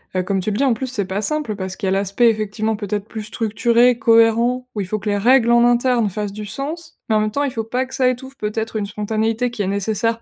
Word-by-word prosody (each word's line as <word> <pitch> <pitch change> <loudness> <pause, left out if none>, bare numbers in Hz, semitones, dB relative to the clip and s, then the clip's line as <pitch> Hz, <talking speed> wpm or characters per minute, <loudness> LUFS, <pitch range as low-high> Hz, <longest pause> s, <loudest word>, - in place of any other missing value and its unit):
Heu, 185 - +1
comme 195 +1 -1
tu 210 - -2
le 205 - -2
dis, - - +1
en 255 - +3
plus, 260 +4 -4
c'est 210 -6 -2
pas 190 +3 -3
simple 295 -4 -1
parce 190 -1 -5
qu'il 195 - -3
y - - +2
a - - 0
l'aspect, 200 +5 +2
effectivement, 215 0 -1
peut-être 205 -1 -3
plus 220 -1 -6
structuré, 235 +3 +2
cohérent, 230 +2 +3
où 205 - -1
il 185 - -4
faut 215 +2 -2
que 210 - -8
les 205 - +1
règles, 235 +2 +4
en 235 0 +5
interne, 240 -2 +2
fassent 205 +1 -4
du 210 0 -6
sens. 310 - -5
Mais, 220 - +3
en 215 - +4
même 215 0 -1
temps, 285 +4 -1
il 275 - -2
faut 225 -3 -3
pas 250 +4 -2
que 260 - -14
ça 255 -2 +3
étouffe 265 +2 -5
peut-être 220 +1 -3
une 210 -2 -1
spontanéité 220 +3 -1
qui 220 - -4
est 190 - -1
nécessaire 220 +3 -1
220 Hz, 275 wpm, -20 LUFS, 205-245 Hz, -, en